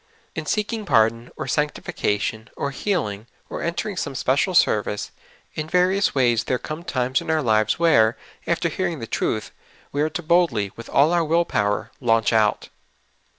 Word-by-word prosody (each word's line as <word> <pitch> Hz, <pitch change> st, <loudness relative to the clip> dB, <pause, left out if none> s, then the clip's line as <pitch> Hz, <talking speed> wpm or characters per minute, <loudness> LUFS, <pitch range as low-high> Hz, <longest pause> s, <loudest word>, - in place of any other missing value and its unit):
In -, -, -5 dB
seeking 215 Hz, +1 st, -1 dB
pardon, 115 Hz, -, +2 dB
or -, -, -4 dB
sanctification, 110 Hz, -7 st, -2 dB
or 140 Hz, -, -2 dB
healing, 130 Hz, -, -2 dB, 0.2 s
or -, -, -4 dB
entering 175 Hz, +5 st, -2 dB
some 140 Hz, -5 st, -4 dB
special 140 Hz, +9 st, +1 dB
sendee, 105 Hz, -, +2 dB, 0.4 s
in 155 Hz, 0 st, -5 dB
various 185 Hz, +2 st, +2 dB
ways 120 Hz, -4 st, +2 dB
there 125 Hz, -, 0 dB
come 155 Hz, +5 st, -6 dB
times 130 Hz, -4 st, 0 dB
in -, -, -8 dB
our 160 Hz, -1 st, +1 dB
lives 110 Hz, -2 st, +2 dB
w'here, 120 Hz, -10 st, +4 dB, 0.3 s
after 170 Hz, 0 st, +1 dB
hearing 175 Hz, 0 st, -2 dB
the 115 Hz, -, -6 dB
truth, 110 Hz, -1 st, -2 dB, 0.4 s
we 145 Hz, -, -1 dB
are 155 Hz, -, +1 dB
to 175 Hz, +1 st, -5 dB
boldly, 155 Hz, -, +2 dB
wdth 115 Hz, -, -11 dB
all 150 Hz, +5 st, +4 dB
our 170 Hz, -1 st, +3 dB
will 165 Hz, +2 st, +2 dB
power, 105 Hz, -6 st, -1 dB
"launch 115 Hz, -2 st, +2 dB
out.'"' 110 Hz, -2 st, +2 dB
140 Hz, 165 wpm, -23 LUFS, 115-170 Hz, 0.4 s, w'here